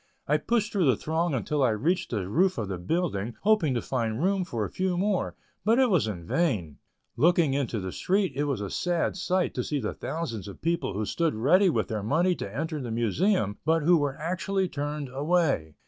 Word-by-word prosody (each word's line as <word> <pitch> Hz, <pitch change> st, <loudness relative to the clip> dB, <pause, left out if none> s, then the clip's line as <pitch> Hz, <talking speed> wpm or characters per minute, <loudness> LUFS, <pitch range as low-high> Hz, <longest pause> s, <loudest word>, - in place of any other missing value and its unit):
I -, -, +3 dB
pushed 230 Hz, -2 st, 0 dB
through 190 Hz, -8 st, +2 dB
the 130 Hz, -, +5 dB
throng 160 Hz, +4 st, -1 dB
until 145 Hz, +4 st, -1 dB
I 130 Hz, -, +4 dB
reached 165 Hz, -, 0 dB
the 100 Hz, -6 st, -2 dB
roof 185 Hz, -, +2 dB
of 110 Hz, -4 st, -3 dB
the 95 Hz, -2 st, -4 dB
building, 115 Hz, -, -1 dB
hoping 195 Hz, -10 st, +3 dB
to 120 Hz, -, -1 dB
find 115 Hz, -3 st, -2 dB
room 195 Hz, 0 st, +2 dB
for 115 Hz, -, -3 dB
a -, -, -5 dB
few 185 Hz, -1 st, -1 dB
more, 195 Hz, 0 st, 0 dB, 0.3 s
but 225 Hz, +4 st, +3 dB
it 260 Hz, -3 st, +4 dB
was 170 Hz, -, +3 dB
in 90 Hz, -6 st, -5 dB
vain. 100 Hz, -, -1 dB, 0.4 s
Looking 170 Hz, -2 st, +3 dB
down 140 Hz, +1 st, +1 dB
into 120 Hz, -4 st, -2 dB
the 95 Hz, -1 st, -4 dB
street 190 Hz, -, +1 dB
it 145 Hz, +2 st, -1 dB
was 140 Hz, -7 st, -1 dB
a 100 Hz, -, -4 dB
sad 175 Hz, -2 st, 0 dB
sight 185 Hz, -1 st, 0 dB
to 125 Hz, -, -2 dB
see 145 Hz, +2 st, -2 dB
the 110 Hz, -, -3 dB
thousands 115 Hz, -, -4 dB
of 100 Hz, -, -9 dB
people 170 Hz, -, -1 dB
who 105 Hz, +1 st, -1 dB
stood 165 Hz, +5 st, 0 dB
ready 180 Hz, -, +4 dB
with -, -, 0 dB
their 110 Hz, -2 st, -3 dB
money 160 Hz, -, +2 dB
to 100 Hz, -, -5 dB
enter 155 Hz, +5 st, -3 dB
the 125 Hz, -, -5 dB
Museum, 115 Hz, -, +1 dB
but 160 Hz, +1 st, +2 dB
who 175 Hz, +3 st, +5 dB
were 145 Hz, -4 st, 0 dB
actually 185 Hz, +4 st, -1 dB
turned 145 Hz, -2 st, -4 dB
away. 140 Hz, -, 0 dB
150 Hz, 220 wpm, -27 LUFS, 115-180 Hz, 0.4 s, the